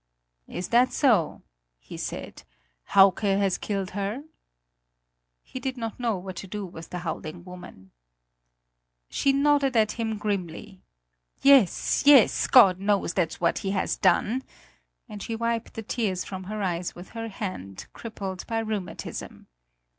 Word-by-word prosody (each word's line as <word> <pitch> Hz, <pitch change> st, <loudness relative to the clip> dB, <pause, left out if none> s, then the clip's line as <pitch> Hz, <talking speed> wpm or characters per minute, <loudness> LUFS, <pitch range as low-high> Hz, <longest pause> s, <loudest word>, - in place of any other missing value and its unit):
"Is 180 Hz, -, -5 dB
that 245 Hz, +2 st, +4 dB
so," 225 Hz, -, +2 dB, 0.3 s
he -, -, -11 dB
said; -, -, -6 dB, 0.5 s
"Hauke 195 Hz, -1 st, +7 dB
has 195 Hz, -2 st, +1 dB
killed 195 Hz, -3 st, -3 dB
her?" 205 Hz, +7 st, -3 dB, 1.2 s
He 260 Hz, -, -8 dB
did 260 Hz, 0 st, -4 dB
not 225 Hz, -1 st, -5 dB
know 230 Hz, -4 st, 0 dB
what 185 Hz, 0 st, -7 dB
to 195 Hz, -, -6 dB
do 205 Hz, +1 st, -5 dB
with 165 Hz, -2 st, -10 dB
the 180 Hz, -, -5 dB
howling 160 Hz, +1 st, -5 dB
woman. 180 Hz, -, -12 dB, 1.2 s
She 275 Hz, -, +2 dB
nodded 280 Hz, -2 st, +2 dB
at 215 Hz, -1 st, +3 dB
him 220 Hz, -2 st, -3 dB
grimly. 195 Hz, -1 st, -4 dB, 0.6 s
"Yes, 270 Hz, -10 st, +5 dB
yes, 280 Hz, -5 st, +6 dB
God 195 Hz, -8 st, +7 dB
knows, 200 Hz, -3 st, +1 dB
that's 170 Hz, -4 st, -1 dB
what 170 Hz, -, +1 dB
he 195 Hz, -, -3 dB
has -, -, 0 dB
done," 210 Hz, +7 st, +2 dB, 0.7 s
and 210 Hz, -3 st, -9 dB
she 225 Hz, -, -4 dB
wiped 230 Hz, 0 st, -2 dB
the 225 Hz, -, -5 dB
tears 205 Hz, -5 st, -2 dB
from 190 Hz, -1 st, -7 dB
her 210 Hz, +1 st, -4 dB
eyes 175 Hz, -1 st, -2 dB
with 175 Hz, +1 st, -11 dB
her 225 Hz, -1 st, -5 dB
hand, 185 Hz, -, -6 dB
crippled 195 Hz, -5 st, -6 dB
by 225 Hz, -, -2 dB
rheumatism. 215 Hz, -4 st, -5 dB
205 Hz, 145 wpm, -26 LUFS, 185-230 Hz, 1.2 s, Hauke